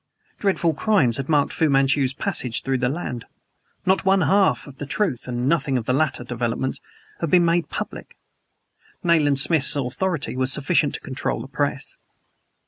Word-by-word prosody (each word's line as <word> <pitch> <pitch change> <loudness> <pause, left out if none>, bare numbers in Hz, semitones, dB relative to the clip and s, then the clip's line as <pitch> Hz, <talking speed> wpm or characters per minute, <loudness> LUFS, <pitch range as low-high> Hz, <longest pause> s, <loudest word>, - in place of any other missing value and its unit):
Dreadful 185 -5 +1
crimes 150 - +2
had 135 +1 -5
marked 145 -2 +2
Fu 160 -2 +1
Manchu's 135 -1 +2
passage 125 -2 -1
through 135 -1 -1
the 125 -1 +1
land. 125 -6 -5 0.6
Not 190 +1 +3
one 195 0 +3
half 195 +1 +2
of 140 -2 -13
the 145 - -5
truth 155 - -1
(and 125 0 -2
nothing 140 -4 +1
of 115 - -3
the 125 - 0
later 150 -2 0
developments) 120 +1 -2 0.4
had 165 - -2
been 175 +2 +5
made 170 0 +1
public. - - -6 0.9
Nayland 155 -5 +3
Smith's 150 +1 +3
authority 145 +5 -2
was 130 0 +2
sufficient 150 +1 +1
to - - -7
control 130 - -3
the - - -7
press. - - -3
140 Hz, 165 wpm, -22 LUFS, 130-170 Hz, 0.9 s, been